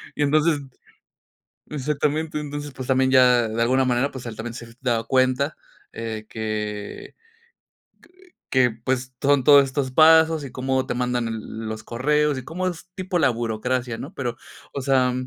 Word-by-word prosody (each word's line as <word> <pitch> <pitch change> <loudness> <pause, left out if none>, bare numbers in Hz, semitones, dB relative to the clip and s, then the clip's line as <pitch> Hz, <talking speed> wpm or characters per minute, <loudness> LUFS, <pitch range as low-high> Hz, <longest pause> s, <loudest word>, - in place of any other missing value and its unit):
y 145 - 0
entonces, 150 +1 +3 1.1
exactamente, 150 +2 -1
entonces, 145 -1 -6
pues 130 -1 -8
también 130 0 +3
ya 125 -3 +5
de 115 +2 -1
alguna 130 +2 +3
manera, 125 +3 +1
pues 130 -2 -9
él 115 -2 -6
también 115 +1 -5
se 120 -2 -8
ha - - -15
dado 115 -3 0
cuenta, 130 +3 +1 0.4
eh, 110 -1 -5
que 105 -2 -5 1.4
que, 130 -2 +4
pues, 130 +3 -3
son 140 -1 +3
todos 140 +1 +7
estos 135 0 -2
pasos 160 +1 +5
y 135 - -8
cómo 130 0 -1
te - - -2
mandan 125 -1 -1
e 115 - -3
los 110 0 -6
correos 150 +5 +1
y 130 - -8
cómo 185 +5 -2
es 175 +1 -7
tipo 185 -1 -2
la 140 -5 +4
burocracia, 120 +1 -2
¿no?, 150 +8 -7
pero, 120 -3 -3 0.4
o 140 - -4
sea, 130 -2 +3
130 Hz, 165 wpm, -23 LUFS, 120-145 Hz, 1.4 s, todos